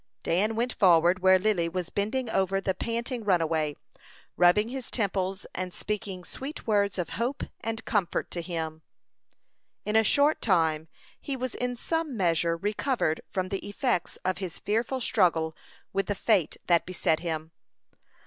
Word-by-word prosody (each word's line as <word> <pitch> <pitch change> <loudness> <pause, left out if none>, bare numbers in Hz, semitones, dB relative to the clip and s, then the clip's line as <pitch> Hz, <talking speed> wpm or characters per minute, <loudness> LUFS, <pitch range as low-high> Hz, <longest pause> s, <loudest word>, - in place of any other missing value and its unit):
Dan 210 +6 +1
went 240 +2 0
forward, 175 -2 +5
where 190 0 +6
Lily 185 -4 +1
was 180 0 -4
bending 225 +6 -1
over 195 0 +1
the 195 -1 0
panting 235 +3 -3
runaway, 160 -6 +1 0.6
rubbing 180 +5 +4
his 260 -1 -5
temples, 195 -3 -1
and 185 0 -3
speaking 205 -3 -4
sweet 275 - -7
words 200 -3 +2
of 180 - -2
hope 255 +4 -1 0.2
and 225 0 -4
comfort 200 -6 0
to 175 - -3
him. 160 -2 -4 1.0
In 210 - -1
a 220 - +6
short 290 +6 +3
time 160 -6 +2 0.3
he 275 -2 -4
was 255 -1 -3
in 245 0 -2
some 320 0 -2
measure 170 -2 +2
recovered 205 - 0
from 185 -1 -2
the 195 - -2
effects 205 -3 -1
of 185 0 0
his 185 -4 -5
fearful 230 +5 -1
struggle 165 -8 +2 0.4
with 195 -1 0
the 205 - 0
fate 195 -5 +2
that 170 -1 +3
beset 165 -3 +1
him. 160 -1 -4
195 Hz, 155 wpm, -28 LUFS, 175-225 Hz, 1.0 s, where